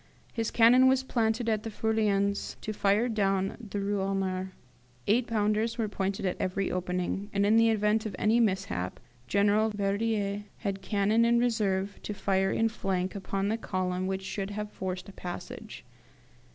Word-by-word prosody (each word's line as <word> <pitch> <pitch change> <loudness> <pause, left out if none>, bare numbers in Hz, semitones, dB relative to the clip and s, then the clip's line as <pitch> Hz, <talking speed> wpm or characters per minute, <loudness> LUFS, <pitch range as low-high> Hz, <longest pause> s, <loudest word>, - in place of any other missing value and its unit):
His 225 -1 -1
cannon 245 +3 +6
was 265 0 +3
planted 230 -2 0
at 215 -2 +1
the 225 - -5
Feuillans 205 -2 0
to 215 - -4
fire 205 +3 +2
down 195 -4 0
the 205 - -3
Rue 200 0 -1
Honore. 190 -1 -2 0.5
Eight 235 +4 +2
pounders 215 +1 0
were 225 -2 0
pointed 195 -1 -2
at 180 - -1
every 190 +1 -1
opening, 180 +2 -2
and 200 0 +2
in 210 +2 +4
the 230 0 +5
event 215 0 +2
of 210 - -6
any 220 +3 +3
mishap, 185 - -1 0.3
General 205 - +3
Verdier 205 0 -1
had 195 -3 -3
cannon 205 +3 +2
in 235 0 +4
reserve 205 -5 0
to 210 - -5
fire 195 -1 +1
in 225 - +2
flank 190 -4 -2
upon 195 0 -2
the 220 - 0
column 185 -2 -2
which 190 0 -2
should 195 0 -4
have 210 0 -5
forced 185 -1 -5
a 200 - -11
passage. 175 -2 -8
205 Hz, 165 wpm, -29 LUFS, 195-220 Hz, 0.5 s, cannon